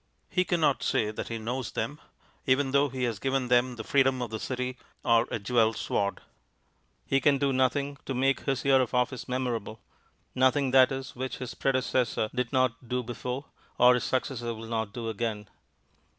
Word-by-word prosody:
He 180 -1 +2
cannot 160 -5 +2
say 105 -1 +1
that 110 - -5
he 115 - -4
knows 120 +3 -4
them, 145 +1 -3 0.5
even 135 +1 +3
though 140 +1 +3
he 130 0 -4
has 115 -5 -1
given 135 -2 -1
them 125 0 +3
the 110 - -6
freedom 135 -3 +2
of 115 - -6
the 110 - -3
City 125 +1 -3 0.3
or 115 -1 +4
a - - -2
jewelled 110 +1 +2
sword. 100 -2 -1 0.8
He 135 0 +1
can 140 +1 +4
do 140 0 +1
nothing 140 +2 0
to 135 - -2
make 135 +2 +2
his 135 -2 -2
year 135 -1 +5
of 125 0 -2
office 125 0 0
memorable; 120 -4 -3 0.5
nothing 130 +1 +2
that 130 0 +6
is, 135 0 -5
which 130 +1 -4
his 125 -2 -6
predecessor 130 -4 0
did 125 -1 -2
not 130 -2 0
do 125 0 -1
before, 125 +3 -5 0.3
or 125 +1 +7
his 125 - 0
successor 120 -3 -2
will 110 +1 -8
not 110 -2 -2
do 115 +1 -5
again. 110 -1 -3
125 Hz, 185 wpm, -28 LUFS, 115-135 Hz, 0.8 s, or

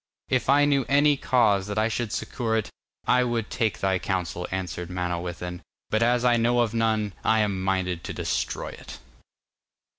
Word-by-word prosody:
'If 130 0 0
I 145 +1 +6
knew 140 -2 +2
any 145 +1 +5
cause 105 -8 +2
that 105 +1 -4
I 110 +1 +3
should 115 -1 -2
succour 115 -3 -1
it, 110 - -3 0.3
I 125 - +4
would 120 -3 -2
take 110 -3 0
thy 95 -1 +1
counsel,' 90 -2 -2
answered 90 -2 -4
Manawyddan, 90 0 -4 0.3
'but 110 - +2
as 120 +1 +2
I 120 -1 +4
know 120 +1 +3
of 115 -2 0
none, 110 -3 0
I 110 0 +3
am 100 -3 -1
minded 95 -2 -1
to - - -4
destroy - - -2
it. - - -10
110 Hz, 175 wpm, -25 LUFS, 95-120 Hz, 0.3 s, I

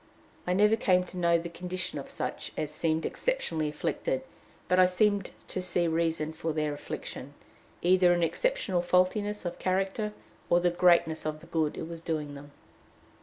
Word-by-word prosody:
I 180 - +2
never 210 +3 +5
came 185 -5 +3
to 180 0 -10
know 170 -1 +4
the 170 +1 -4
condition 180 -1 -4
of 140 - -8
such - - -4
as 150 - -2
seemed 160 0 0
exceptionally 165 - -1
afflicted - - -2 0.4
but 180 - +3
I 185 - +7
seemed 200 +1 +2 0.2
to 185 - -2
see 180 -1 0
reason 160 -1 0
for 160 0 -3
their 150 -1 0
affliction, 145 - -7 0.5
either 180 0 +5
in 175 -1 +2
exceptional 210 - 0
faultiness 185 +4 +1
of 175 - -4
character 195 +3 0 0.4
or 175 - +5
the 175 0 +2
greatness 170 -2 +4
of 155 0 -3
the 165 - -14
good 160 -3 -1
it 160 - -4
was 165 -1 -7
doing 155 -3 -3
them. 145 +1 -11
175 Hz, 170 wpm, -29 LUFS, 160-185 Hz, 0.5 s, I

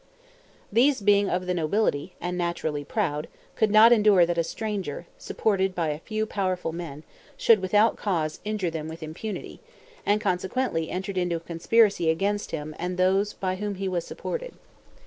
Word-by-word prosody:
These 260 +4 +4
being 200 0 +4
of 180 +1 -1
the 180 - 0
nobility, 175 -1 0
and 175 0 -3
naturally 170 -4 -2
proud, 150 -3 -2 0.3
could 220 - +2
not 215 +3 +7
endure 210 -6 +6
that 170 0 -1
a - - +3
stranger, 195 -4 -4
supported 190 -3 0
by 165 -3 0
a 150 0 -3
few 215 +5 -2
powerful 185 -5 -2
men, 160 -3 -7 0.3
should 230 -3 +5
without 205 +4 +3
cause 160 -6 -1
injure 210 -5 -2
them 160 -1 -5
with 160 +1 -8
impunity, 175 +7 -6 0.4
and 205 +1 +2
consequently 185 -2 -1
entered 190 +1 -3
into 175 -1 0
a - - -2
conspiracy 175 +2 +2
against 200 +6 0
him 155 -1 -5
and 180 0 -3
those 195 +3 +2
by 185 -1 -2
whom 205 0 -3
he 195 +1 -3
was 180 -2 -1
supported. - - -6
185 Hz, 165 wpm, -26 LUFS, 165-210 Hz, 0.4 s, not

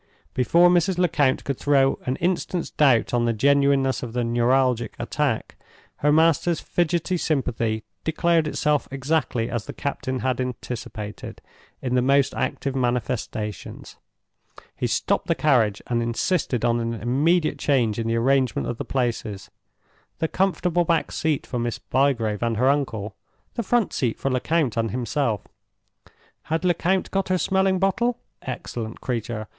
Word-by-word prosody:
Before 170 +8 +4
Mrs. 180 +1 +2
Lecount 155 -7 +2
could 140 -3 -3
throw 135 -2 +3
an 130 - +1
instant's 175 +1 -1
doubt 130 -7 +3
on 120 -1 +2
the 115 - +1
genuineness 140 +2 +3
of 120 -2 -6
the 125 0 0
neuralgic 120 0 +1
attack, 140 -7 -2 0.4
her 150 - +2
master's 165 +2 +3
fidgety 175 +1 0
sympathy 120 -8 -1 0.2
declared 165 0 +2
itself 150 -1 0
exactly 135 -3 -1
as 120 -3 -4
the - - -6
captain 130 -2 -3
had 130 -1 0
anticipated, 115 -4 -6 0.4
in 125 -1 -1
the 125 - +3
most 140 +1 +3
active 135 -1 -2
manifestations. 120 - -3 0.8
He - - -1
stopped - - 0
the - - +2
carriage, 115 -9 +2
and 120 -1 0
insisted 120 - 0
on 120 0 +2
an 115 0 -2
immediate 150 +9 +1
change 120 -7 +1
in 115 - -2
the 115 - +1
arrangement 130 +2 +1
of 120 - -4
the - - -3
places—the 120 +4 -5
comfortable 180 -2 +1
back 165 -2 0
seat 155 -3 -1
for 125 - -3
Miss 120 0 -2
Bygrave 120 -6 0
and 115 -2 0
her 130 +4 +3
uncle, 110 -8 -1 0.4
the 240 - -2
front 235 0 +1
seat 120 -4 -1
for 135 - -1
Lecount 130 -1 0
and 115 0 +1
himself. 120 0 -1 1.0
Had 165 +3 -1
Lecount 180 +2 +1
got 195 -1 -1
her 185 - +2
smelling 190 +2 +2
bottle? 235 +6 +1 0.2
Excellent 120 -3 -6
creature! 115 -3 -3
130 Hz, 145 wpm, -24 LUFS, 120-160 Hz, 1.0 s, Before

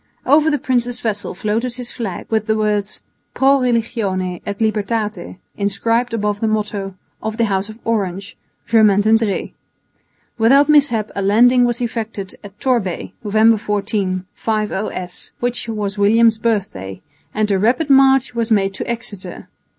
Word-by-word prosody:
Over 300 +3 +4
the 295 - +1
prince's 245 -2 -1
vessel 205 -5 -3
floated 225 +5 -2
his 250 -1 -6
flag 210 -7 -5
with 220 -1 0
the 220 0 +1
words 210 -1 -1 0.3
Pro 275 +1 +4
Religione 220 -7 -1
et 200 -1 -3
Libertate 215 -3 -2 0.2
inscribed 230 +4 0
above 210 -2 -1
the 225 - +1
motto 205 -3 -2 0.3
of 220 0 -4
the 230 - +2
House 195 0 -1
of 215 - -10
Orange, 200 -3 -2 0.3
Je 230 - +2
maintiendray. 215 0 +2 0.9
Without 275 +6 +5
mishap 275 -8 +3
a 200 - -2
landing 245 +5 +4
was 240 0 -1
effected 220 -5 -4
at 205 0 -13
Torbay, 235 -9 -1
November 220 +2 +4
14 200 -3 -2
(5 215 -1 -2
o.s.), 185 -3 -6
which 245 -1 -1
was 210 -2 -3
William's 220 +2 +4
birthday, 185 - -2 0.4
and 215 -1 +1
a 195 - +2
rapid 260 - +1
march 270 -1 +5
was 230 -1 -1
made 195 -3 +2
to - - -5
Exeter. 215 -6 -6
220 Hz, 150 wpm, -18 LUFS, 200-235 Hz, 0.9 s, Without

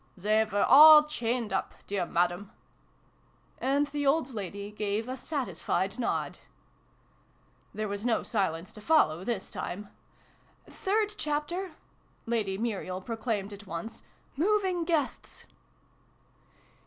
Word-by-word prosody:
" - - -37
They 215 +4 +2
were 205 -1 0
all 305 +1 +10
chained 240 -7 -2
up, 190 - -2
dear 195 -3 -2
Madam! 175 +3 0 0.6
" - - -36 0.3
And 280 +2 +2
the 290 0 -3
old 275 -2 +2
lady 200 0 -6
gave 210 +2 -2
a 255 - -3
satisfied 205 - -2
nod. 240 - -2 1.3
There 215 0 -3
was 200 +1 -4
no 235 -2 +1
silence 185 -5 -2
to 210 - -12
follow, 195 - +3
this 200 -2 -3
time. 200 +3 -6 0.4
" - - -34
Third 420 +2 -1
Chapter! 310 +5 -2 0.3
" - - -38 0.2
Lady 215 -5 -1
Muriel 195 -5 -3
proclaimed 220 -2 -3
at 200 0 -12
once, 170 +6 -6 0.2
" - - -36
Moving 370 +1 +1
Guests 320 -5 -2
225 Hz, 130 wpm, -29 LUFS, 200-295 Hz, 1.3 s, all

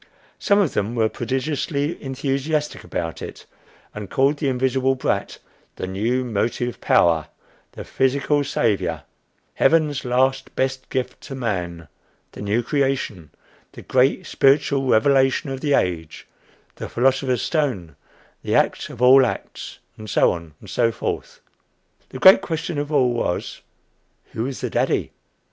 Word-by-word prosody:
Some 200 - +3
of 200 -8 +2
them 110 +4 -1
were 110 -2 +2
prodigiously 140 - -2
enthusiastic 140 +3 -2
about 80 -2 -4
it, - - -8 0.5
and 105 -2 -7
called 140 +2 +2
the 145 - -1
invisible 130 0 +1
brat 130 - -2 0.4
the - - -4
New 115 +7 -1
Motive 120 +2 -2
Power, 80 -2 +3 0.5
the - - -8
Physical 140 +2 +1
Savior, 110 -7 -1 0.5
Heaven's 155 -4 +2
Last 130 +1 0
Best 130 0 -2
Gift 130 -1 -3
to 135 - -8
Man, 90 - -3 0.4
the - - -10
New 105 +4 0
Creation, 135 - -1 0.4
the - - -11
Great 135 +8 +2
Spiritual 135 -2 +2
Revelation 135 +3 +3
of 135 0 -5
the 145 -2 +2
Age, 80 -3 -2 0.5
the - - -6
Philosopher's 130 0 +1
Stone, 120 - -1 0.5
the - - -1
Act - - +1
of 120 - -5
all 130 +2 +8
Acts, - - -5 0.2
and 110 0 -8
so - - +4
on, 85 -3 -7
and - - -14
so 115 -1 +1
forth. - - -5 0.7
The - - -8
great 190 +8 +8
question 165 -2 -3
of 145 +1 -4
all 130 -5 +3
was, 100 -7 -3 0.7
Who 110 - -3
was 135 -1 -5
the - - -2
daddy? - - 0
130 Hz, 140 wpm, -22 LUFS, 110-140 Hz, 0.7 s, all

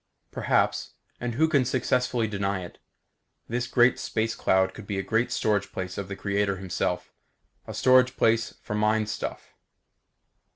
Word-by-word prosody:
Perhaps - - 0 0.2
and 120 -1 -3
who 160 +5 +4
can 145 -5 +3
successfully 125 -1 +1
deny 100 -2 -2
it? 85 - -13 0.7
this 120 +1 -2
great 120 0 +4
space 110 +1 -1
cloud 95 0 +2
could 105 0 -11
be 100 - -2
a 110 +4 0
storage 100 -2 0
place 90 -1 -5
of 100 - -4
the 100 - -5
Creator 100 0 0
Himself; 95 -2 -3 0.5
a - - -6
storage 130 0 +4
place 115 0 +2
for - - -5
mind 105 0 +1
stuff. - - -5
110 Hz, 150 wpm, -26 LUFS, 100-120 Hz, 0.7 s, who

